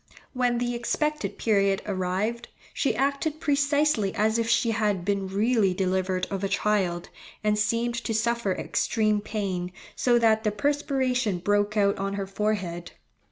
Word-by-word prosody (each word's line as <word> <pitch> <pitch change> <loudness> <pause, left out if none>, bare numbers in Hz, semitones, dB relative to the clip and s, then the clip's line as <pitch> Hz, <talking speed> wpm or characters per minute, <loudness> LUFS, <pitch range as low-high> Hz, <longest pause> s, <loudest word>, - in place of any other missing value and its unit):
When 245 -2 +1
the 245 0 -1
expected 300 +6 -2
period 200 -3 +2
arrived, 200 +5 -2 0.3
she 275 - 0
acted 280 +4 0
precisely 285 - +1
as 220 +2 +2
if 230 0 -1
she 235 0 +3
had 210 -5 0
been 200 -1 0
really 205 -1 +2
delivered 185 0 0
of 195 0 -3
a 195 - 0
child, 195 -4 0 0.3
and 210 0 +2
seemed 235 +2 0
to 225 - -1
suffer 235 -2 0
extreme 215 +2 0
pain, 190 -4 -3 0.2
so 245 -1 +3
that 220 -2 +3
the 210 - +1
perspiration 260 -3 0
broke 205 +3 +1
out 200 -1 +2
on 195 0 -2
her 200 -1 -3
forehead. 195 -4 -3
215 Hz, 150 wpm, -26 LUFS, 195-240 Hz, 0.3 s, she